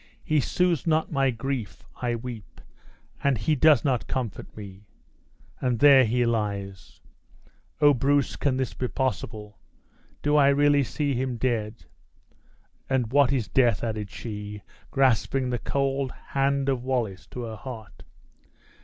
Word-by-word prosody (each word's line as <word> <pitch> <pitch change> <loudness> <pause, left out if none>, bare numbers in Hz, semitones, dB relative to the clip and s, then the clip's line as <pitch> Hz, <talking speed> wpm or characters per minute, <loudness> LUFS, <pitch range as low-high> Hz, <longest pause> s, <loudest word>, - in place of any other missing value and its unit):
He 155 -1 +2
soothes 175 +2 0
not 160 0 +1
my 135 -3 +2
grief 125 -2 -4 0.2
I 120 -1 0
weep, 115 -3 -8 0.6
and 140 -3 +2
he 110 +9 0
does 155 +1 +4
not 130 -5 0
comfort 120 -6 -5
me! 100 -1 -10 0.7
And 125 -2 0
there 135 0 +7
he 120 +2 +1
lies! 100 -4 -3 0.8
O! 145 -1 +7
Bruce, 140 +2 +1
can 135 -3 0
this 130 -3 -2
be 125 - -3
possible? 110 -6 -4 0.6
Do 150 +1 +3
I 140 -2 +6
really 145 +1 +4
see 145 +2 -2
him 125 -1 -2
dead? 115 -2 -2 1.0
And 125 -4 0
what 140 -1 +4
is 125 -6 0
death?" 120 -6 +2
added 110 -3 -3
she, 105 -2 -7 0.3
grasping 130 -1 +1
the 120 - -1
cold 135 0 -1 0.2
hand 140 0 +1
of 130 -3 0
Wallace 120 -7 -2
to 125 - -7
her 110 -1 -6
heart. 115 -1 -9
125 Hz, 140 wpm, -26 LUFS, 110-140 Hz, 1.0 s, there